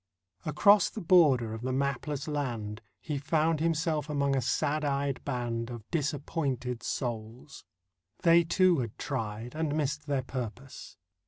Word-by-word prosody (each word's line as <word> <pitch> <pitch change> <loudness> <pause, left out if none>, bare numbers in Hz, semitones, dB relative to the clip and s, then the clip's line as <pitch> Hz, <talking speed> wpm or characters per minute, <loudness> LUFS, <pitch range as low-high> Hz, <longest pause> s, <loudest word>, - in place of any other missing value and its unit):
Across 200 +6 +5
the - - -7
border 150 - +4
of 110 - -6
the 130 +1 -2
mapless 140 +2 -2
land 120 -8 -3 0.2
He 150 -3 -3
found 155 +2 +1
himself 160 -2 0
among 140 -2 +1
a 135 - +1
sad 145 +5 0
eyed 140 -1 -1
band 120 -3 -2
Of 120 -3 -8
disappointed 140 -5 -2
souls; 120 +2 -5 0.6
they, 170 0 +6
too, 175 0 +3
had 115 -4 -4
tried 110 +2 -4
And 155 -1 -1
missed 150 0 -2
their 140 -2 0
purpose. 125 +1 -7
140 Hz, 140 wpm, -29 LUFS, 120-155 Hz, 0.6 s, they